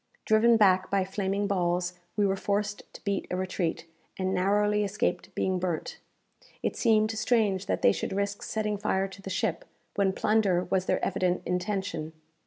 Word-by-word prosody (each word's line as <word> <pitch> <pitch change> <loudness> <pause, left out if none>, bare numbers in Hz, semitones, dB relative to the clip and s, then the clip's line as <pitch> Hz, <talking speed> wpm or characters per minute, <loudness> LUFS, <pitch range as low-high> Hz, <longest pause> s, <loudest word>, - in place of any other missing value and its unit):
Driven 225 +2 +5
back 185 -3 +4
by 195 -1 +1
flaming 195 +1 -1
balls, 180 -2 0 0.2
we 205 - +3
were 195 0 +2
forced 205 +1 -2
to - - -12
beat 200 -1 -1
a - - -2
retreat, 185 -3 -2 0.3
and 185 0 -1
narrowly 205 +3 +2
escaped 200 -1 -1
being 185 -1 0
burnt. 175 -3 -3 0.6
It - - -1
seemed 215 -2 +3
strange 215 -4 +1
that - - -1
they - - +7
should - - -3
risk 200 +1 -2
setting 210 -2 -2
fire 195 -1 0
to 195 +1 -12
the 195 - -7
ship, 190 -1 -1 0.3
when 200 -1 +2
plunder 205 -4 +2
was 185 0 -1
their - - +1
evident 185 -1 0
intention. 180 -3 -2
195 Hz, 170 wpm, -28 LUFS, 185-210 Hz, 0.6 s, they